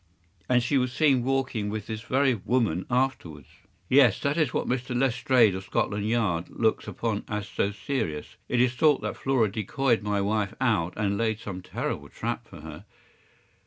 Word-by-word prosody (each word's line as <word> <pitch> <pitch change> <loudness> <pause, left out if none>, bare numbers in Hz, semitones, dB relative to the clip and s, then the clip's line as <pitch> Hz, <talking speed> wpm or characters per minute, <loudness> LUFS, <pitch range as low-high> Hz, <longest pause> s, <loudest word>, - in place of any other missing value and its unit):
” 85 - -39 0.2
“And 125 -1 +3
she 135 +3 +2
was 125 -1 0
seen 135 -2 +3
walking 130 -5 -1
with 105 -1 -4
this 110 -1 -5
very 130 +2 +2
woman 110 -5 0
afterwards?” 120 - -1 0.4
“Yes. 125 -4 +5
That 140 +1 0
is 155 -5 +1
what - - -1
Mr. 125 0 -1
Lestrade, 125 -4 +3
of 95 0 -6
Scotland 105 +2 -1
Yard, 105 -8 +1
looks 110 -1 0
upon 110 -3 -2
as 105 -1 -3
so 100 - -1
serious. 100 - -4
It 125 - +1
is 125 0 +3
thought 145 +2 +3
that - - -3
Flora 125 -6 +1
decoyed 115 +4 0
my 105 -1 -1
wife 100 0 -1
out, 105 -10 +1
and 100 -2 0
laid 110 -2 0
some 95 -4 -6
terrible - - -4
trap - - -4
for - - -12
her. - - -10
115 Hz, 180 wpm, -27 LUFS, 100-130 Hz, 0.4 s, Yes